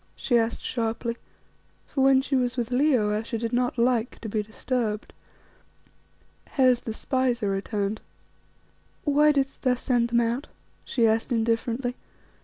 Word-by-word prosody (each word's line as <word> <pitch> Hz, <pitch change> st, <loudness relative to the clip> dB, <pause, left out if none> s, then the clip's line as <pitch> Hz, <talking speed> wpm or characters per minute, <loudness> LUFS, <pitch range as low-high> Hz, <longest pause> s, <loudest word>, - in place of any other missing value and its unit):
she 245 Hz, -, 0 dB
asked 230 Hz, -1 st, +1 dB
sharply; 230 Hz, 0 st, -2 dB, 0.7 s
for 270 Hz, -, -2 dB
when 270 Hz, 0 st, +5 dB
she 275 Hz, -, -1 dB
was 250 Hz, -1 st, 0 dB
with 240 Hz, 0 st, -2 dB
Leo 250 Hz, -5 st, +3 dB
Ayesha 225 Hz, +2 st, -2 dB
did 230 Hz, +1 st, -3 dB
not 245 Hz, 0 st, 0 dB
like 235 Hz, -1 st, +1 dB
to 225 Hz, -, -6 dB
be 215 Hz, 0 st, -1 dB
disturbed. 220 Hz, 0 st, -3 dB, 1.3 s
"Hes, 255 Hz, -3 st, +3 dB
the 225 Hz, -, -6 dB
spies 250 Hz, 0 st, 0 dB
are 200 Hz, -, +1 dB
returned." 200 Hz, +1 st, -2 dB, 1.0 s
"Why 295 Hz, +1 st, +4 dB
didst 275 Hz, -2 st, -1 dB
thou 255 Hz, -1 st, +2 dB
send 245 Hz, -1 st, +1 dB
them 235 Hz, 0 st, +2 dB
out?" 235 Hz, +4 st, -1 dB, 0.4 s
she 235 Hz, -3 st, +1 dB
asked 225 Hz, +3 st, +1 dB
indifferently. 230 Hz, +2 st, 0 dB
240 Hz, 145 wpm, -26 LUFS, 225-255 Hz, 1.3 s, when